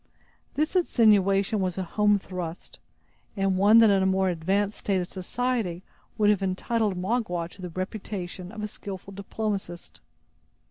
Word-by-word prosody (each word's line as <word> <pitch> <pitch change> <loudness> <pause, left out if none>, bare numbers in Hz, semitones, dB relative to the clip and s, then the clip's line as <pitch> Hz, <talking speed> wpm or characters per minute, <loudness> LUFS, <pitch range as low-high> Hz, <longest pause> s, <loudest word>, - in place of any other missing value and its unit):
This 310 +5 0
insinuation 210 - +3
was 185 -2 -1
a 190 - -1
home 210 +3 +2
thrust, 180 -3 -7 0.6
and 195 -1 +1
one 205 +4 +6
that 225 -2 +7
in 195 -1 +3
a 190 - +2
more 190 0 +2
advanced 195 +5 0
state 195 -2 0
of 180 - -3
society 195 -2 -2 0.3
would 210 -1 +4
have 205 - 0
entitled 195 +2 0
Magua 180 -3 -1
to 195 - -14
the 180 - -5
reputation 185 0 -5
of 215 -1 -7
a - - -1
skillful 195 -1 -8
diplomatist. 195 -3 -5
195 Hz, 150 wpm, -26 LUFS, 185-210 Hz, 0.6 s, that